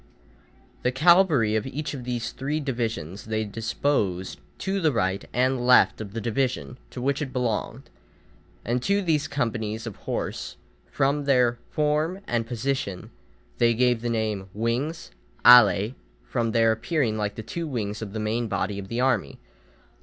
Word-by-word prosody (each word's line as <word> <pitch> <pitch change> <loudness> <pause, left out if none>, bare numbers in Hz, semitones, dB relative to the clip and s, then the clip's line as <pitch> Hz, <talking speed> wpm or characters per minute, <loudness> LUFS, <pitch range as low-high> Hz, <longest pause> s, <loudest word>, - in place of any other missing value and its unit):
The 125 - +1
cavalry 150 - +4
of 110 +3 -1
each 150 +3 -4
of 130 -4 -7
these 120 -2 -3
three 145 +3 -2
divisions 115 - -3
they 110 0 -1
disposed 105 - -1 0.2
to 195 0 -2
the 160 -3 +3
right 95 -5 0
and 125 +1 +1
left 125 -2 +5
of 100 -2 -7
the 115 - -3
division 120 +2 -2
to - - -8
which 135 +3 0
it 135 -3 -3
belonged; 125 0 -2 0.8
and 120 +2 0
to 200 +7 +1
these 155 -4 +1
companies 115 -5 -2
of 110 -4 -6
horse, - - -4 0.3
from 140 +1 0
their 125 -3 +3
form 155 +4 0
and 115 -1 -1
position, 120 -5 -3 0.5
they 115 -1 +4
gave 125 -1 +2
the 120 - -2
name 110 -4 -2
wings 125 +9 -2 0.3
(alæ), 115 -2 +7 0.3
from 115 - -1
their 115 0 +4
appearing 120 +1 0
like 105 -1 -2
the 110 - -6
two 165 +9 -4
wings 110 -6 -3
of 105 -3 -5
the 110 - -4
main 110 +2 -1
body 100 0 -2
of 95 - -7
the 115 +4 -3
army. 125 - +1
120 Hz, 160 wpm, -25 LUFS, 110-135 Hz, 0.8 s, alæ